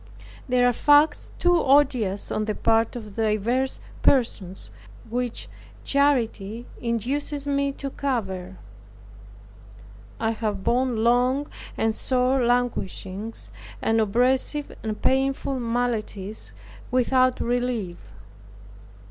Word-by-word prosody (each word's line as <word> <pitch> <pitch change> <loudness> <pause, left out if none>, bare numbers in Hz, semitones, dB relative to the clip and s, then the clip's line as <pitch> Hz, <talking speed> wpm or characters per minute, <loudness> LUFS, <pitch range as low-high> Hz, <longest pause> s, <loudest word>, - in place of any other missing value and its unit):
There 250 0 +4
are 245 - +3
facts 290 +5 +4
too 350 0 +3
odious 260 -8 +2
on 215 - 0
the 215 -1 -2
part 225 +1 +2
of 215 -4 -8
divers 225 +4 +1 0.2
persons, 200 -8 +1 0.4
which 245 +1 -3 0.4
charity 240 -6 +1 0.2
induces 270 +5 -1
me 280 0 +1
to 275 0 -5
cover. 190 -10 -3 1.6
I 225 0 +1
have 215 -3 -3
borne 245 -2 +1
long 250 +4 +3 0.3
and 225 0 +1
sore 255 +3 +1
languishings, 225 -4 -2 0.3
and 225 0 +2
oppressive 255 +7 +1
and 215 -1 -4
painful 270 0 +1
maladies 230 -4 -2 0.4
without 255 0 +3
relief. 240 -7 -1
245 Hz, 95 wpm, -25 LUFS, 220-265 Hz, 1.6 s, There